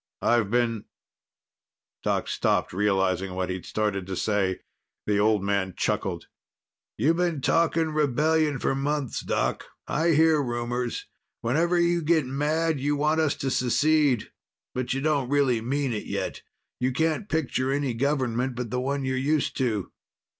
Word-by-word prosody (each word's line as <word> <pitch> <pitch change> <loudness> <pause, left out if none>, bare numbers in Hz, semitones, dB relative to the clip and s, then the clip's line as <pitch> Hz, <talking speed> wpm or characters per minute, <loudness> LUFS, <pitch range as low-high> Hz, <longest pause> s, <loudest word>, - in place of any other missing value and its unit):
"I've 115 -4 +3
been 115 -2 0 0.6
" - - -67
Doc - - 0
stopped, - - 0
realizing 95 -2 +1
what 90 0 -2
he'd 90 -1 -6
started 105 -3 -1
to 95 - -3
say. 100 -2 0 0.4
The 105 -1 +1
old 105 -1 +3
man 100 -2 -1
chuckled. - - -1 0.7
"You've 155 +9 +2
been 175 -4 0
talking 165 +2 +2
rebellion 150 +1 +2
for 135 - 0
months, 140 0 -1
Doc. - - -1 0.2
I 165 +2 +1
hear 160 0 +4
rumors. 120 -1 -3 0.4
Whenever 165 +9 +2
you 170 0 +2
get 160 -2 +2
mad, 150 +4 0
you 145 +2 0
want 155 +2 +2
us 155 -3 +1
to 135 - -2
secede. 140 0 +2 0.4
But 125 -1 -2
you 135 - -2
don't 145 -4 +1
really 135 -5 +2
mean 135 +2 -1
it 105 - -4
yet. - - -3 0.4
You 130 +1 +1
can't 160 +8 0
picture 135 -4 0
any 140 -2 0
government 130 -1 0
but 120 -2 -4
the 125 - -1
one 140 +1 -1
you're 130 0 -1
used 145 +3 0
to." 110 -7 -1
130 Hz, 155 wpm, -26 LUFS, 115-150 Hz, 0.7 s, hear